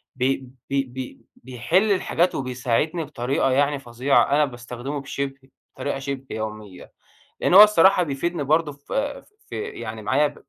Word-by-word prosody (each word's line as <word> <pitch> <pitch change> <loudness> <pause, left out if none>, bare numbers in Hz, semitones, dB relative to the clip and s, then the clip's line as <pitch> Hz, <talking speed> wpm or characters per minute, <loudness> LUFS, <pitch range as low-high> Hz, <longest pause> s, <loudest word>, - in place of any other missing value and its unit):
بي 130 0 -1 0.2
بي 135 0 +1
بي 130 0 -8
بيحِلّ 130 - 0
الحاجات 185 -2 +1
وبيساعدني 130 +6 -1
بطريقة 135 -1 -1
يعني 140 +1 +2
فظيعة، 125 +2 +2
أنا 150 +1 +4
باستخدمه 125 +2 -6
بشِبه 135 -1 -5 0.3
بطريقة 140 -1 -3
شِبه 135 -1 -5
يوميّة، 105 -4 -7 0.5
لأن - - +2
هو 205 - +12
الصراحة 195 -2 +6
بيفيدني 165 +1 -2
برضه 155 +1 +2
ف 140 0 -15 0.6
في - - -4
يعني 235 - -7
معايا 145 +7 +1
135 Hz, 135 wpm, -23 LUFS, 125-150 Hz, 0.6 s, هو